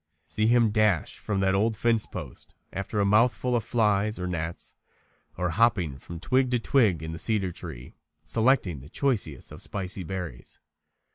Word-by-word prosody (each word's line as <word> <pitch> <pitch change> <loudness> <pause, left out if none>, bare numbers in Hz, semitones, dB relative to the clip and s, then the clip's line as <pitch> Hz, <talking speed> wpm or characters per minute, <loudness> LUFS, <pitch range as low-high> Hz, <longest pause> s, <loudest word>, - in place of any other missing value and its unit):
See 110 +6 0
him 115 -2 +4
dash 105 -5 +1
from 100 -2 -2
that 95 0 +2
old 105 +3 +1
fence 115 -1 +1
post - - -8 0.2
after 100 +2 -3
a 100 - +3
mouthful 120 +4 +3
of 115 - +1
flies 105 -2 +1
or 90 - -3
gnats; 85 -2 -4 0.6
or 90 -1 0
hopping 90 - +2
from 85 +4 -9
twig 130 +7 +2
to 125 -1 +1
twig 110 - +2
in 80 - -4
the 80 - -6
cedar 105 -5 0
tree, 60 -6 -9 0.3
selecting 110 - +2
the 70 +3 -13
choicest 100 - -1
of - - -9
the - - -5
spicy 95 -1 -3
berries. 90 -2 -6
100 Hz, 170 wpm, -27 LUFS, 90-115 Hz, 0.6 s, him